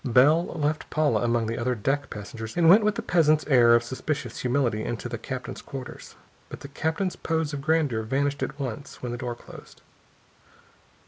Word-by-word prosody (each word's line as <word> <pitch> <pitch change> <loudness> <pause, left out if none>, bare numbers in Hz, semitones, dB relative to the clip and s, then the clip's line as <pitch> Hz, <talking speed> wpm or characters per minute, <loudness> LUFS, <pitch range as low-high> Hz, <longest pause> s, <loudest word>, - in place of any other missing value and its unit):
Bell 145 +7 +4
left 155 -1 -2
Paula 155 -1 +1
among 120 -1 +1
the 115 +2 -3
other 125 +1 0
deck 135 +6 -1
passengers 110 +4 -7
and 170 -2 +4
went 200 +6 +8
with 210 -1 +2
the - - -4
peasant's 155 -3 +3
air 120 -5 +6
of 120 - +3
suspicious 130 +1 -4
humility 125 -4 0
into 120 0 -4
the 120 -1 -5
captain's 130 +2 -6
quarters. 130 -1 -9 0.3
But - - -9
the 140 - -9
captain's 160 +6 -2
pose 160 -2 -2
of 140 - -4
grandeur 150 -6 +1
vanished 140 +5 -1
at 145 - -4
once 130 0 -6
when 125 - -3
the 120 - -4
door 120 -1 -3
closed. - - -14
135 Hz, 185 wpm, -26 LUFS, 120-155 Hz, 0.3 s, went